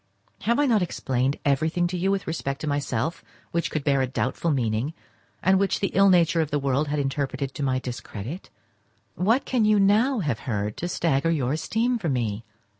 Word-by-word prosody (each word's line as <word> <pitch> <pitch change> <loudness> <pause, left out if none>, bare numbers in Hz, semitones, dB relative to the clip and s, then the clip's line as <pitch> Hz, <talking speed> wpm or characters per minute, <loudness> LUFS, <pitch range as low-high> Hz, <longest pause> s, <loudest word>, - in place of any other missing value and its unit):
Have 235 +3 +1
I 290 - +3
not 225 -6 +3
explained 135 -5 -1
everything 160 +5 +1
to 175 +1 -2
you 180 +2 0
with 195 -1 0
respect 140 -4 -3
to 155 - -3
myself 145 +1 -2 0.3
which 170 0 -1
could 155 - -3
bear 140 -2 +2
a 130 - +1
doubtful 130 +5 -1
meaning, 125 +1 0 0.5
and 190 +1 +4
which 200 0 +1
the 195 - 0
ill 195 +1 +5
nature 170 -2 +4
of 155 - -2
the 145 - 0
world 140 +1 0
had 150 +1 -1
interpreted 135 -1 -2
to - - -6
my 130 -2 +1
discredit? 125 - -6 0.6
What 225 +9 +1
can 250 -4 +1
you 210 -1 +4
now 215 +7 +4
have 145 - -1
heard 105 -1 -1
to 175 - -3
stagger 165 -3 +1
your 140 -5 0
esteem 230 +9 0
for 175 -6 -2
me? 115 -5 -1
155 Hz, 195 wpm, -25 LUFS, 135-190 Hz, 0.6 s, ill